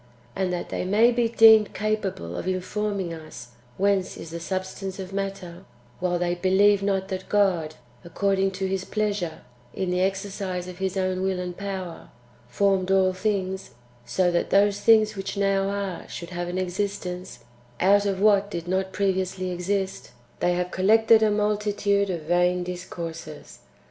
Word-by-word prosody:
And 190 -1 -1
that 175 -1 -4
they - - -2
may 210 +6 +4
be 235 -1 +1
deemed 220 -2 +6
capable 200 - -2
of 175 - -5
informing 190 0 -2
us 155 -6 -10 0.3
whence 195 -1 +1
is 160 - -9
the 170 - -5
substance 190 +2 -4
of 190 0 -7
matter, 195 -3 -5 0.4
while 180 -1 0
they 175 0 0
believe 195 +3 +3
not 195 -1 -1
that 190 -1 -5
God, 180 -7 +1 0.3
according 195 +2 0
to 190 +1 -3
His 190 0 -2
pleasure, 205 -6 -2 0.3
in 185 -2 -1
the 180 0 +1
exercise 195 -1 -2
of 180 0 -9
His 190 0 -2
own 185 -1 0
will 190 -1 0
and 180 -1 -4
power, 190 -3 -6 0.4
formed 190 +7 +1
all 190 -1 +3
things 190 -1 -2 0.3
(so 175 +9 +1
that 175 - 0
those 200 +1 +3
things 215 -1 +5
which 195 +1 -5
now 195 -1 +1
are 200 -3 -4
should 170 +1 -7
have 175 0 -3
an 175 +1 -3
existence) 185 -5 -4 0.4
out 200 +2 +4
of 195 -1 -1
what 200 -1 +4
did 170 -4 -5
not 190 +1 -1
previously 185 -1 -1
exist, 190 0 -3 0.3
they 175 - +2
have 180 0 -2
collected 220 +3 +5
[a 220 - +4
multitude 205 -1 +1
of] 175 -3 -2
vain 175 +2 +2
discourses. 175 -2 -7
190 Hz, 160 wpm, -25 LUFS, 180-200 Hz, 0.4 s, deemed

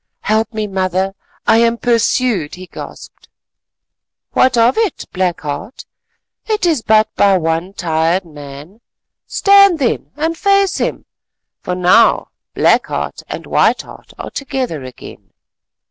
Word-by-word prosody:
"Help 220 +2 0
me, 215 -1 -3
mother, 190 -1 -1 0.3
I 225 - +4
am 235 0 +2
pursued," 230 - +1
he 185 +1 -10
gasped. - - -11 1.0
"What 255 -2 +3
of 235 +2 +4
it, 445 -7 -1
Black 180 -2 -1
Heart, 150 - -6 0.6
it 430 -4 0
is 320 -8 +2
but 220 0 +3
by 200 -2 +4
one 165 +2 -2
tired 170 +1 0
man. 150 +6 -11 0.5
Stand 395 -3 +5
then 265 -6 -1
and 320 +3 -1
face 395 +1 +2
him, - - -2 0.6
for 180 -2 -3
now 185 +6 +4 0.3
Black - - +3
Heart - - -4
and - - -6
White - - +2
Heart - - -15
are - - -7
together 260 - -4
again. 130 -1 -12
215 Hz, 130 wpm, -16 LUFS, 175-255 Hz, 1.0 s, Stand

